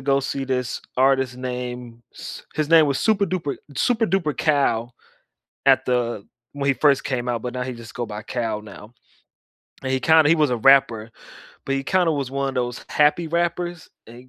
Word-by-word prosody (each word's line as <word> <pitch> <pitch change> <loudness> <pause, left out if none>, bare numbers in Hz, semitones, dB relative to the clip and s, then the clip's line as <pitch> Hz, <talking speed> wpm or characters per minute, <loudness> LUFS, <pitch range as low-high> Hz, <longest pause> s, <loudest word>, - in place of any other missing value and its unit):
go 140 +1 +2
see 135 0 -3
this 125 -2 -2 0.2
artist 130 -1 +2
named 125 -2 -6
S - - -9
his 155 -1 -1
name 165 -1 +6
was 140 -2 0
Super 210 -2 +2
Duper 170 -6 -3 0.2
Super 230 -2 +2
Duper 170 -6 0
Cal 125 -6 +1 0.7
at 135 -1 +5
the 120 -4 -1 0.3
when 140 -1 -3
he - - +4
first 140 0 +3
came 125 -2 -3
out, 120 -2 -1
but 125 -1 -5
now 125 0 -3
he 130 0 -5
just 115 -1 -11
go 120 - -3
by 105 -1 -7
Cal 115 -3 -3
now. 105 +2 -13 0.9
And 130 0 -2
he 130 - 0
kinda 160 -1 +5
he 165 - +6
was 150 -4 +2
a 125 - +1
rapper, 115 -3 +4 0.6
but 135 - 0
he 135 - -1
kinda 180 -1 +2
was 140 -4 -2
one 140 0 -1
of - - -11
those 125 -1 -3
happy 150 +3 +2
rappers, 175 +1 -2 0.2
and 115 - -13
he 125 +1 -15
135 Hz, 195 wpm, -22 LUFS, 120-150 Hz, 0.9 s, name